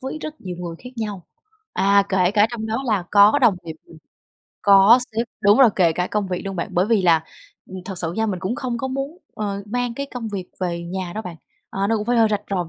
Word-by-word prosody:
với 265 +3 -5
rất 310 0 -7
nhiều 180 -2 -6
người 175 -2 -6
khác 250 - -8
nhau. 210 -5 -4 0.5
À, 200 +1 +4
kể 185 -2 +2
cả 210 +1 +4
trong 225 -2 -5
đó 225 +4 -2
là 210 -6 0
có 205 +6 +6
đồng 240 -7 +4
nghiệp 160 -1 -7
mình, 160 - -15 0.6
có 200 +4 +7
sếp 230 +2 -1
đúng 205 +3 +5
rồi, 255 -5 +7
kể 170 -4 +4
cả 180 +2 -1
công 210 -2 -2
việc 180 - -3
luôn 195 -1 -4
bạn. 170 - -3
Bởi 180 +3 +2
vì 220 -3 +2
là, 165 -3 +3 0.4
ừm, 190 - -8
thật 190 -3 -6
sự 165 -2 -3
nha, 220 +4 -1
mình 195 -4 -2
cũng 190 +5 -2
không 245 -2 -3
có 265 - -3
muốn, 275 +5 -4 0.2
ờ, 200 -2 -4
mang 245 +2 -2
cái 280 +3 -4
công 240 -4 -6
việc 190 -3 -5
về 175 -2 -2
nhà 180 +1 -5
đâu 220 - -4
bạn. 180 -5 -8 0.3
Ờ, 195 +1 -1
nó 225 +2 +1
cũng 210 - -3
phải 245 - +1
hơi 225 -1 +5
rạch 210 -1 -1
ròi 185 -3 0
một - - -13
205 Hz, 260 wpm, -21 LUFS, 185-230 Hz, 0.6 s, có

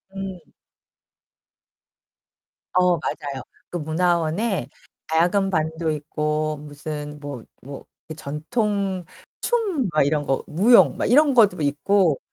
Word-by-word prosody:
음. 195 -1 -5 2.4
어 180 -1 +4
맞아요. 140 -3 -4 0.3
그 175 - -4
문화원에 170 +5 0 0.4
가야금 180 +5 +2
반도 160 -1 -1
있고 150 0 -2
무슨 150 0 -7
뭐 140 -5 -7 0.2
뭐 140 +2 -10 0.3
이 - - -5
전통 190 +5 -2 0.4
춤 400 - 0
막 155 - +2
이런 145 +1 0
거 135 -1 0
무용 210 +10 +5
막 - - -1
이런 285 +4 +5
것도 205 -8 +4
있고. 155 +3 +2
160 Hz, 185 characters per minute, -23 LUFS, 150-195 Hz, 2.4 s, 무용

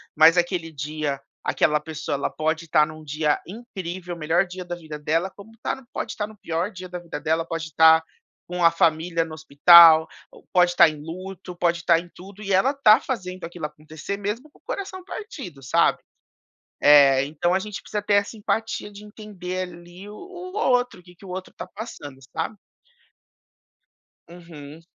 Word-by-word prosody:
mas 160 +3 +7
aquele 175 -2 0
dia, 145 -1 -3 0.2
aquela 150 0 +2
pessoa, 155 0 -5
ela 140 - -2
pode 160 +1 -2
tá 150 0 +5
num 155 0 -11
dia 150 0 0
incrível, 185 -5 -7
o 170 - -12
melhor 165 +5 +2
dia 180 +1 -7
da 175 0 -5
vida 155 -3 -9
dela, 165 +5 0
como 205 +2 -13
tá 265 - -3
pode - - -4
tá 210 - -3
no 215 -1 -15
pior 170 +4 -3
dia 185 0 -9
da 180 0 -6
vida 170 -3 -7
dela, 160 +2 0
pode 165 -2 -5
tá 160 0 +7 0.4
com 180 0 -3
a 170 - +8
família 165 0 +1
no 160 - -10
hospital, 160 +1 +7 0.2
ou - - -18
pode 175 -1 +4
tá 170 - +8
em 155 -1 -9
luto, 185 +2 -8
pode 170 -1 0
tá 170 -1 +5
em 175 0 -11
tudo 200 +3 -12
e 195 - -1
ela 195 +9 +4
tá 235 -4 +6
fazendo 185 -8 -5
aquilo 170 -2 -6
acontecer 155 +5 -7
mesmo 210 +8 -4
com - - -24
o - - -49
coração 380 -2 -5
partido, 270 - -8
sabe?". 130 - +3 0.8
É, 140 -2 +6
então 155 +4 -1
a 190 - +2
gente 210 0 -7
precisa 210 - -4
ter 205 0 0
essa 200 +2 0
empatia 220 0 -2
de 205 +1 -12
entender 185 -4 -6
ali 175 +3 -13
o 210 - -10
o 370 - -9
outro, 245 - +1
que 175 0 -17
que 195 - -16
o - - -10
outro 185 +1 -7
tá - - -7
passando, 150 - -9 0.2
sabe? 215 - -2 1.7
Uhum. 165 -2 -12
175 Hz, 185 wpm, -24 LUFS, 160-200 Hz, 1.7 s, a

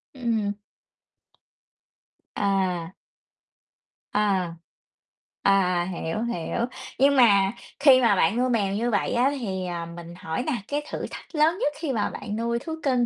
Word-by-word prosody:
Ừm. 225 -5 0 1.8
À. 185 -4 0 1.2
À. 195 -5 +1 0.9
À, 180 -3 +3
hiểu, 170 +5 -3
hiểu, 235 0 -2 0.3
nhưng 280 +1 +5
mà 200 -6 +5 0.3
khi 270 -3 +7
mà 230 -4 +4
bạn 185 +4 +2
nuôi 255 +1 +2
mèo 200 -4 +1
như 235 +3 0
vậy 205 - 0
á 250 +3 +3
thì, 190 -6 -3
à, 170 -1 -4
mình 170 0 -9
hỏi 160 +4 -3
nè, 305 - -1
cái 290 +1 -2
thử - - -3
thách - - -10
lớn 315 +3 +3
nhất 295 -11 0
khi 300 -4 -2
mà 215 -4 0
bạn 205 - -6
nuôi 235 +1 -1
thú 320 +5 -5
cưng 255 -3 +2
210 Hz, 145 wpm, -25 LUFS, 185-250 Hz, 1.8 s, khi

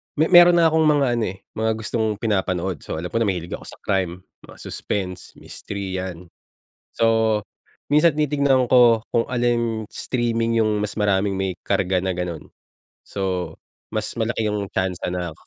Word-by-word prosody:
Me 155 +4 +1
meron 175 0 +8
na 165 -1 +5
akong 160 0 +3
mga 145 -2 +4
ano, 115 - 0
eh, 95 +1 -8 0.2
mga 110 0 +1
gustong 110 -1 -1
pinapanood. 95 -6 -1
So, - - -6
alam 90 - -4
ko 115 - 0
na 115 - +1
mahilig 90 -3 -3
ako - - -6
sa - - -10
crime, 95 -2 -1 0.2
mga - - -14
suspense, 90 -3 -5
mystery 95 -2 -6
yan. 90 -2 -7 0.6
So, 115 -2 +2 0.5
minsan 150 +1 +4
titignan 140 -4 +2
ko 120 -3 +6
kung 115 - +1
alin 120 -2 0
streaming 115 -2 0
yung 105 -1 +1
mas 105 0 -3
maraming 100 -2 +1
may 95 -2 -3
karga 90 0 +1
na 95 0 -1
ganun. 90 -3 -5 0.5
So, 95 -3 -3 0.3
mas - - -3
malaki 115 -1 -1
yung 105 -2 -2
tiyansa 95 -1 -2
na, 90 -2 -3
105 Hz, 165 wpm, -22 LUFS, 95-120 Hz, 0.6 s, meron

